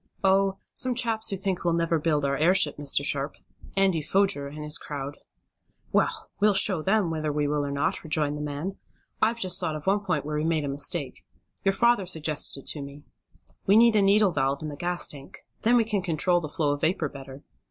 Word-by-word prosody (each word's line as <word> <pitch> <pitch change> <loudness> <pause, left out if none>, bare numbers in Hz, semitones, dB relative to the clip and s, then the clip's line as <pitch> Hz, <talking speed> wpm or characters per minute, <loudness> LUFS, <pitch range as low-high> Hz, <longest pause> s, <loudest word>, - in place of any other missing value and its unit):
"Oh, 195 0 +3 0.2
some 255 -1 +1
chaps 230 -2 +1
who 195 - -1
think 190 -1 -2
we'll 170 -1 +1
never 165 -1 +1
build 150 -2 0
our 140 0 0
airship, 160 +1 +3
Mr. 145 -1 0
Sharp. 140 +1 -1 0.4
Andy 190 -4 +2
Foger, 190 -3 +1
and 150 +2 -8
his 150 0 +1
crowd." 145 -1 -6 0.7
"Well, - - 0
we'll 210 -1 +3
show 190 -3 +3
them 195 0 +1
whether 155 -1 -2
we 145 0 0
will 145 0 0
or 140 - -3
not," 140 0 -1
rejoined 150 -2 -1
the 150 - -5
man. 150 +6 -4 0.4
"I've 225 +2 +2
just 185 -4 +2
thought 160 -4 -2
of 155 - -7
one 195 +2 +2
point 180 -8 -2
where 150 0 -3
we 150 - -1
made 160 -2 0
a - - -3
mistake. 145 +2 -2 0.4
Your 195 - +2
father 235 -5 +3
suggested 155 -4 -1
it - - -22
to 150 - -3
me. 140 +1 -10 0.6
We 200 +2 +6
need 230 -1 +6
a 210 - +5
needle 200 0 +4
valve 140 -1 -1
in 155 - -4
the 145 - -7
gas 175 +3 -1
tank. 140 -2 -9 0.2
Then 240 +2 +4
we 230 - +3
can 210 -3 -1
control 175 +1 +1
the 155 - -5
flow 150 -1 0
of 145 - -3
vapor 160 -2 0
better." 135 0 -11
160 Hz, 215 wpm, -26 LUFS, 145-195 Hz, 0.7 s, We